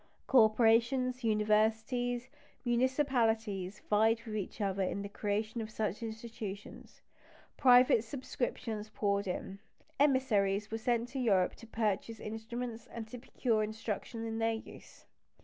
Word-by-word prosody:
Corporations, 240 +2 +4
universities, 225 +3 +1 0.3
municipalities, 235 -6 +1
vied 220 +2 +3
with 220 -2 -5
each 205 0 -4
other 195 -2 0
in 195 +2 -1
the - - -4
creation 215 +3 -2
of 220 - -5
such 215 -1 -2
institutions; 220 -3 -7 0.5
private 250 -3 +6
subscriptions 225 -3 -4
poured 200 -1 0
in; 190 +2 -4 0.4
emissaries 215 -8 +2
were 225 - -2
sent 235 +1 0
to 270 - -4
Europe 195 -7 +3
to 230 - -13
purchase 220 0 -1
instruments 230 +2 -5
and 230 -3 -7
to 245 - -7
procure 230 -2 0
instruction 220 +1 -4
in 225 0 -3
their 225 0 +2
use. 220 - -10
225 Hz, 125 wpm, -33 LUFS, 210-240 Hz, 0.5 s, private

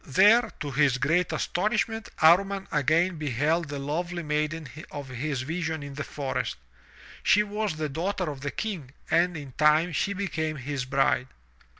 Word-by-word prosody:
There, 210 - +5
to 145 -3 -3
his 135 -1 +3
great 160 +7 +1
astonishment, 215 +3 -1
Amman 195 +4 +5
again 160 +4 +2
beheld 150 +3 0
the 145 - -4
lovely 170 +5 -3
maiden 155 +1 -1 0.2
of 140 -2 -7
his 130 +1 -3
vision 160 0 -3
in 140 0 -7
the 145 +2 -4
forest. 140 -2 -3 0.7
She 210 - +4
was 210 -3 -2
the 155 0 -2
daughter 180 +5 -2
of 135 -2 -9
the 140 - -2
King 160 -9 -5 0.2
and 175 0 +3
in 140 -3 -8
time 155 +3 +4
she 195 +5 0
became 160 -6 -2
his 135 -1 -4
bride. 135 -1 +2
155 Hz, 160 wpm, -27 LUFS, 145-180 Hz, 0.7 s, There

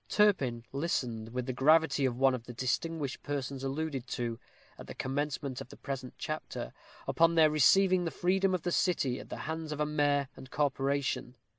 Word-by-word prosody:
Turpin 135 - +2
listened 125 -7 -2
with 125 0 -3
the 130 - -2
gravity 145 +1 +4
of 125 -2 0
one 135 0 +4
of 120 -2 -4
the 120 - -9
distinguished 140 +3 -2
persons 140 -2 -4
alluded 135 -2 -3
to, 115 -2 -3 0.4
at - - -9
the - - -8
commencement 140 -1 -2
of - - -9
the - - -12
present 130 -2 -5
chapter, - - -5 0.3
upon 165 0 +3
their 155 -2 +6
receiving 185 +5 +5
the - - 0
freedom 185 +2 +1
of 175 - -4
the 175 - -1
city 145 - +1
at 105 +3 -11
the - - -5
hands 160 0 -4
of 150 - -4
a 150 - +2
mayor 145 -2 +1
and 130 0 -11
corporation. 135 -3 -1
140 Hz, 185 wpm, -31 LUFS, 130-160 Hz, 0.4 s, their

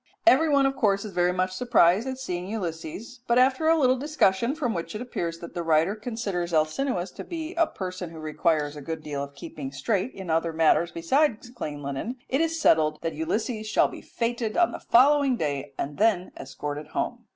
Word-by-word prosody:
Every 320 0 +6
one, 280 -2 +4
of 270 0 +1
course, 200 -5 +1
is 205 - -7
very 175 0 +2
much 185 +1 0
surprised 210 0 +3
at 260 0 -3
seeing 180 -8 -4
Ulysses, 195 +4 -5
but 235 - +3
after 260 +5 +3
a 325 0 +5
little 255 -3 +3
discussion, 260 -4 +1
from 255 -8 -1
which 170 +3 -5
it - - -3
appears 170 -9 -3
that 170 0 -10
the 175 - -3
writer 165 +3 +2
considers 210 -7 -3
Alcinous 175 - 0
to - - -8
be 330 0 -5
a 335 -3 +2
person 185 - -6
who 165 - -11
requires 155 -1 0
a 150 - -8
good 160 +2 -5
deal 145 -2 -3
of 140 0 -9
keeping 300 -5 -7
straight 220 -1 -1
in 190 -4 -5
other 165 +1 +1
matters 165 +1 +3
besides 240 - +1
clean 150 - -6
linen, 140 - -4
it 270 +4 +1
is 330 0 0
settled 155 - +3
that 165 - -1
Ulysses 215 - -2
shall 215 - +3
be - - -9
feted 230 -2 -2
on 345 -1 +4
the - - -6
following 275 +1 +4
day 140 -4 -3
and 145 +3 -4
then 205 -4 +2
escorted 145 +2 -6
home. 240 +8 -3
195 Hz, 205 wpm, -26 LUFS, 165-255 Hz, -, Every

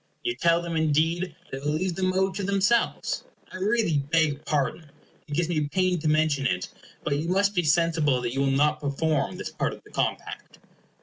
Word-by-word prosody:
You 360 - 0
tell 170 0 +2
them, 170 -1 -4
indeed, 160 +2 +1 0.2
that 135 +1 -6
you 145 - 0
will 150 - +1
leave 185 +1 -1
the 185 - -5
mode 190 +1 +1
to 200 - -4
themselves. 200 +4 +1 0.3
I - - -7
really 200 -5 +1
beg 150 0 +1
pardon 150 +1 -1 0.4
it - - -14
gives 170 +1 +1
me 155 -4 0
pain 185 0 +1
to 155 - -2
mention 155 -3 +2
it 90 -6 -2 0.3
but 145 -2 0
you 165 +3 -3
must 200 +2 +2
be 180 - +2
sensible 160 -4 +2
that 120 0 -2
you 135 - -2
will 140 - +2
not 150 +3 +2
perform 145 0 -1
this - - -5
part - - -1
of - - -13
the - - -18
compact. - - -3
160 Hz, 205 wpm, -26 LUFS, 145-185 Hz, 0.4 s, tell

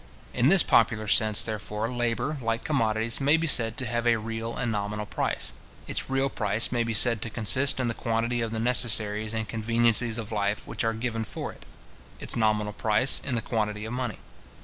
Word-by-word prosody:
In 120 - +2
this 185 +2 +6
popular 110 -2 +2
sense, 110 0 +4
therefore, 105 0 -4
labour, 120 +5 -2
like 115 -1 -2
commodities, 115 -4 0
may 145 +4 +4
be 165 - -1
said 115 -6 +2
to 130 - -2
have 120 +1 -2
a 120 - +4
real 115 +1 -5
and 125 - -2
a - - -1
nominal 105 0 -3
price. - - -2 0.3
Its - - -5
real 135 +1 +1
price 110 -3 0
may 120 -1 +1
be 115 - -3
said 115 0 +4
to 115 - -2
consist 130 +6 +2
in 125 - 0
the 115 - -1
quantity 115 +1 -1
of 115 - -2
the 110 - -3
necessaries 110 -2 +2
and 110 -1 -2
conveniencies 115 +1 +1
of 110 -2 -6
life 105 -1 -1
which - - -4
are 115 0 0
given 115 0 -3
for - - -6
it; - - -18 0.5
its - - -4
nominal 105 -2 0
price, 110 +5 +1
in 135 -3 -3
the 115 - -2
quantity 105 -2 -2
of 110 - -6
money. 125 -4 -3
115 Hz, 205 wpm, -26 LUFS, 110-120 Hz, 0.5 s, this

